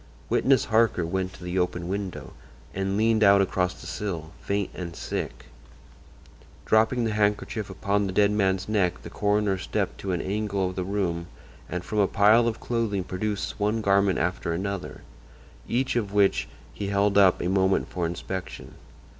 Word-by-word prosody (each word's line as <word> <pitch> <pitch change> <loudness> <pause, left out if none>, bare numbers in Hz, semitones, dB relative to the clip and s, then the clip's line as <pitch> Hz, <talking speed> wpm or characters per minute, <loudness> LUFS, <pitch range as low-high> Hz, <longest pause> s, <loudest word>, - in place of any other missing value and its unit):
Witness 135 0 +3
Harker 110 -6 +2
went 95 +2 -2
to 90 - -12
the 90 +1 -1
open 90 -1 -1
window 95 -1 -4 0.4
and 95 +1 -1
leaned 110 0 +3
out 100 -1 +7
across 90 -1 0
the - - -11
sill, 85 -6 -4
faint 100 -1 -1
and 85 -2 -6
sick. - - -5 1.2
Dropping 110 +3 +3
the 110 - 0
handkerchief 105 0 0
upon 100 +1 0
the - - -3
dead 100 +2 +3
man's 95 -2 +1
neck 95 -5 0
the - - -9
coroner 105 -2 +1
stepped - - -2
to 95 - -3
an 90 - 0
angle 100 -1 -1
of 90 - -6
the 95 - -2
room 90 -3 -2 0.4
and 90 +1 -3
from 105 - -2
a 100 - +4
pile 110 +5 +5
of 115 -1 -2
clothing 115 -5 -1
produced 100 +3 -3
one 105 +2 +1
garment 100 -1 +3
after 85 -1 -1
another, 95 +2 -4 0.7
each 130 +2 0
of 105 -5 -1
which 100 -1 +2 0.3
he 100 - -4
held 100 0 +2
up 95 -3 +5
a - - -1
moment 95 +1 +2
for 90 -2 -2
inspection. 90 +2 -6
100 Hz, 170 wpm, -26 LUFS, 95-105 Hz, 1.2 s, out